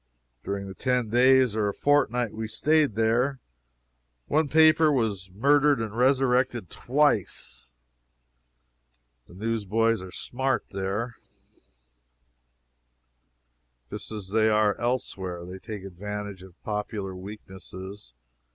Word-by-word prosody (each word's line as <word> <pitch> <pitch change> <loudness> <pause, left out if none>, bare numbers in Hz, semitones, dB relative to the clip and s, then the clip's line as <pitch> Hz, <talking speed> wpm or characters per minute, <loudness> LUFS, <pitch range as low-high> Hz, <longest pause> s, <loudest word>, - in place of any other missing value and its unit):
During 100 0 -3
the 95 - -7
ten 125 -1 -1
days 130 -1 +5
or 105 -2 +1
a 100 - -5
fortnight 125 -6 +2
we 110 0 -4
staid 150 0 +2
there 120 +5 +1 0.9
one 155 0 +1
paper 155 +1 +5
was 105 -8 -1
murdered 140 +7 +3
and 110 -1 -4
resurrected 125 - +2
twice. 130 - 0 1.6
The 85 - -15
newsboys 115 +1 0
are 95 -1 -9
smart 130 +4 -2
there, 100 +5 -3 2.7
just - - -6
as 105 -3 -6
they 110 +1 +3
are 105 -1 +3
elsewhere. 95 -8 -2
They 90 +1 -8
take 105 -2 -7
advantage 100 +1 -6
of 95 -2 -15
popular 105 -2 -4
weaknesses. 95 - -10
110 Hz, 105 wpm, -26 LUFS, 100-130 Hz, 2.7 s, days